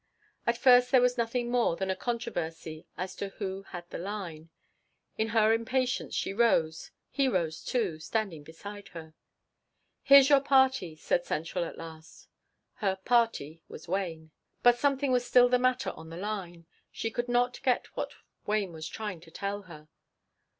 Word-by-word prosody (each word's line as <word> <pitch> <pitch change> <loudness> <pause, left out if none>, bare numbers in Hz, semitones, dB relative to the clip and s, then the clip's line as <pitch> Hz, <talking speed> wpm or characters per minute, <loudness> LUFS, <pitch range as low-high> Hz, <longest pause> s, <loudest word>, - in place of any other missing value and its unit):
At 235 0 +2
first 250 -1 +6
there 255 - +6
was 250 0 +3
nothing 240 0 -1
more 240 -8 +2
than 190 +1 -2
a - - -1
controversy 175 -9 -4
as 185 +1 -4
to 200 - -4
who 195 -2 -4
had 175 -3 -9
the - - -5
line. 175 -5 -6 0.7
In 220 - 0
her 220 0 +4
impatience, 250 +2 -1
she - - -1
rose; 180 -8 +2 0.2
he 275 0 +2
rose, 170 -8 -1
too, 200 -11 -1
standing 195 -2 -2
beside 200 +7 -10
her. 160 -1 -10 0.9
"Here's 275 -1 +8
your 280 -1 +6
party," 265 - +3
said 175 +2 0
central 165 +3 -2
at - - -8
last. 160 -1 -11 0.5
Her 195 -2 0
"party" 190 -7 0
was 160 - -11
Wayne. 165 -4 -3 0.3
But 245 0 +6
something 275 0 +1
was 250 -1 +2
still 245 0 +5
the 250 0 +3
matter 255 +1 +1
on 160 0 -12
the 165 - -8
line; 180 -4 -5 0.3
she 225 - -3
could 240 +1 -3
not 245 +1 +1
get 250 -2 +1
what - - -3 0.4
Wayne 205 -4 0
was 160 0 -6
trying 205 -2 -5
to 165 0 -16
tell 200 +4 -4
her. 155 -2 -12
205 Hz, 165 wpm, -29 LUFS, 165-245 Hz, 0.9 s, Here's